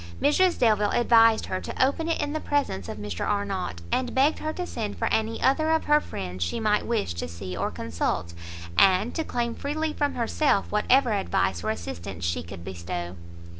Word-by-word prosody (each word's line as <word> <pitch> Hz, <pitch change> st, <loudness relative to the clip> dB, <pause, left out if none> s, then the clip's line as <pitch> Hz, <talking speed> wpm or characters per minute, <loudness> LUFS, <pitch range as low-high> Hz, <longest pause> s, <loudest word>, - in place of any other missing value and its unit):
Mrs 350 Hz, +5 st, +3 dB
Delvile 210 Hz, -3 st, +3 dB
advised 230 Hz, -1 st, +5 dB
her 185 Hz, -, -3 dB
to -, -, +1 dB
open 320 Hz, +5 st, -1 dB
it 330 Hz, -, 0 dB
in 290 Hz, -, -2 dB
the 310 Hz, -, -1 dB
presence 280 Hz, -, -1 dB
of -, -, -5 dB
Mr 105 Hz, -4 st, -4 dB
Arnott, 195 Hz, -, -2 dB
and 250 Hz, -1 st, 0 dB
begged 280 Hz, +4 st, +3 dB
her 310 Hz, -, -2 dB
to 360 Hz, +3 st, -4 dB
send 215 Hz, -10 st, -4 dB
for 225 Hz, -, -1 dB
any 220 Hz, +1 st, 0 dB
other 310 Hz, +4 st, +3 dB
of 320 Hz, 0 st, +2 dB
her 300 Hz, 0 st, +4 dB
friends 90 Hz, -, -5 dB
she 85 Hz, -, -2 dB
might 210 Hz, -1 st, +1 dB
wish 225 Hz, -, 0 dB
to 85 Hz, -, -4 dB
see 90 Hz, +2 st, -7 dB
or -, -, -1 dB
consult, 85 Hz, +2 st, -3 dB, 0.4 s
and 195 Hz, -, +4 dB
to 320 Hz, -, -1 dB
claim 235 Hz, -5 st, -2 dB
freely 305 Hz, +4 st, -2 dB
from 290 Hz, -1 st, -1 dB
herself 240 Hz, -1 st, +1 dB
whatever 245 Hz, +4 st, +3 dB
advice 95 Hz, -, 0 dB
or -, -, -1 dB
assistance 90 Hz, -2 st, -5 dB
she 85 Hz, -1 st, 0 dB
could 85 Hz, +1 st, -9 dB
bestow. 85 Hz, -1 st, -5 dB
210 Hz, 195 wpm, -26 LUFS, -, 0.4 s, advised